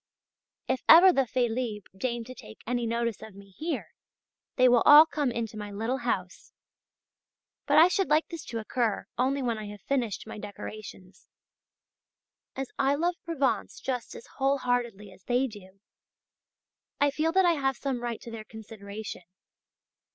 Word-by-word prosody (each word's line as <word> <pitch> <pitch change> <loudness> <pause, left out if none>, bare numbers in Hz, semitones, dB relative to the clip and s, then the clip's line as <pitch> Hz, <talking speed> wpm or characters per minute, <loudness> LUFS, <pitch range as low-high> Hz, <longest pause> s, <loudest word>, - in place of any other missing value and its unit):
If 260 0 -1
ever 355 +3 +9
the 270 -4 +1
"Félibres" 235 -3 -1
deign 235 +3 -3
to 255 +3 -10
take 110 - -13
any 240 0 -1
notice 235 -1 -2
of 215 -3 -11
me 200 0 -14
here, 320 - -4 0.6
they 255 -1 +5
will 245 -1 +5
all 300 +1 +9
come 295 -4 -1
into 225 -2 -4
my 210 0 -6
little 225 +6 -2
house. 185 -7 -4 1.1
But - - +3
I 325 +3 +9
should 385 +1 0
like 305 +1 +3
this 335 -3 -7
to 230 - -5
occur 225 -1 -1
only 270 +2 +1
when 230 -3 -1
I 215 - -6
have 205 0 -10
finished 245 -8 -2
my 220 -1 -8
decorations. 205 -2 -10 1.3
As 270 -1 -5
I 275 0 +3
love 345 +4 0
Provence 270 -10 -1
just 250 -3 -4
as - - -10
whole 275 +1 +2
heartedly 235 -6 -2
as 185 - -18
they 250 +2 +2
do, 195 -5 -11 1.2
I 285 0 +3
feel 310 +3 0
that 380 0 +4
I 345 - +4
have 270 -4 -1
some 265 -3 -3
right 240 -2 -4
to 235 - -9
their 225 -1 -7
consideration. 215 -2 -9
240 Hz, 165 wpm, -28 LUFS, 215-275 Hz, 1.3 s, ever